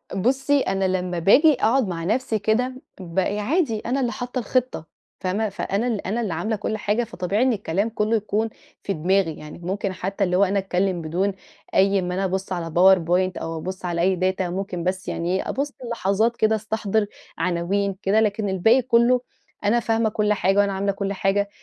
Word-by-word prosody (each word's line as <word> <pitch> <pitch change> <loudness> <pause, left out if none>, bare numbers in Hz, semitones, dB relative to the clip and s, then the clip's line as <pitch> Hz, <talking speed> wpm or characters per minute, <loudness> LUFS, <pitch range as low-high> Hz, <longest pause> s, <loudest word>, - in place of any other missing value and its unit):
بصي، 270 +7 +2
أنا 195 0 0
لما 180 -2 -1
باجي 285 - +6
أقعد 245 -2 +2
مع 165 -2 -4
نفسي 220 +2 0
كده، 250 +5 0 0.2
بقي 190 +3 -1
عادي 235 - 0
أنا 255 +5 -2
اللي 245 -2 0
حاطة 250 +1 -4
الخطة 245 -7 -1 0.3
فاهمة، 200 +4 -1
فأنا 200 +3 -2
ال 215 -5 -2
أنا 230 +4 -1
اللي 195 -7 -2
عاملة 215 +7 -1
كل 215 +1 -3
حاجة، 210 +3 0
فطبيعي 205 +2 -1
إن 260 -2 +3
الكلام 200 +1 -1
كله 220 +1 0
يكون 215 +1 0 0.3
في 195 - -1
دماغي، 175 +1 +1
يعني 150 +2 -10
ممكن 190 +2 -3
حتى 195 +2 -2
اللي 180 -1 +1
هو 200 - +5
أنا 200 +1 +2
أتكلم 185 -2 -1
بدون 185 +5 -1 0.4
أي 195 0 +4
أما 180 0 -2
أنا 190 +1 -1
أبص 190 +1 -3
على 170 -2 -3
powerpoint 180 +1 +3
أو 165 0 -4
أبص 185 +2 -6
على 170 -1 -1
أي 185 +1 +3 0.2
data 190 - -5
ممكن 180 -1 -3
بس 185 +1 -2
يعني 175 +2 -1
إيه، - - -2
أبص 280 +1 -2 0.2
لحظات 225 +2 +1
كده 220 0 +3
استحضر 220 -1 -1 0.3
عناوين 185 +3 0
كده، 205 +3 +3
لكن 210 -1 0
الباقي 220 +7 +4
كله 245 0 +3 0.4
أنا 225 +4 +3
فاهمة 225 -1 +1
كل 210 0 +1
حاجة 195 0 +1
وأنا 200 -1 +2
عاملة 200 +1 0
كل 200 0 -3
حاجة، 200 +1 0
200 Hz, 190 wpm, -23 LUFS, 185-220 Hz, 0.4 s, باجي